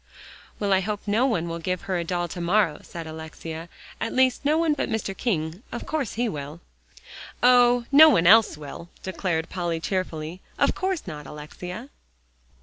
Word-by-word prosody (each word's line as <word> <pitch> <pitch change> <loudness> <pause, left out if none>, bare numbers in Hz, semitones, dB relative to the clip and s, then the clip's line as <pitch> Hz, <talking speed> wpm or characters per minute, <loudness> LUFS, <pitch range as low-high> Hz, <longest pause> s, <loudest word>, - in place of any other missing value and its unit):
"Well, 200 -2 +1
I 190 - +4
hope 205 +2 -3
no 220 +6 +2
one 175 -10 0
will 170 0 -4
give 180 +2 -2
her 185 -2 -2
a - - -1
doll 175 0 -2
to 175 - -6
morrow," 175 -3 +2
said 170 -1 -8
Alexia, 160 +1 -8 0.3
"at - - -3
least 260 +1 +2
no 300 +2 +3
one 325 -2 +2
but 295 - -2
Mr. 215 -3 -2
King. 170 -5 -2
Of 240 - -5
course 295 -8 -2
he 240 +2 0
will." 150 -3 -6 0.8
"Oh! 245 -1 +5
no 310 +3 +9
one 200 - +3
else 215 -2 +6
will," 150 +3 -9
declared 180 -3 -2
Polly 175 -3 -2
cheerfully. 170 -1 -3 0.2
"Of - - +3
course 375 -3 -2
not, 150 -6 -7
Alexia." 180 - -8
185 Hz, 175 wpm, -25 LUFS, 165-240 Hz, 0.8 s, no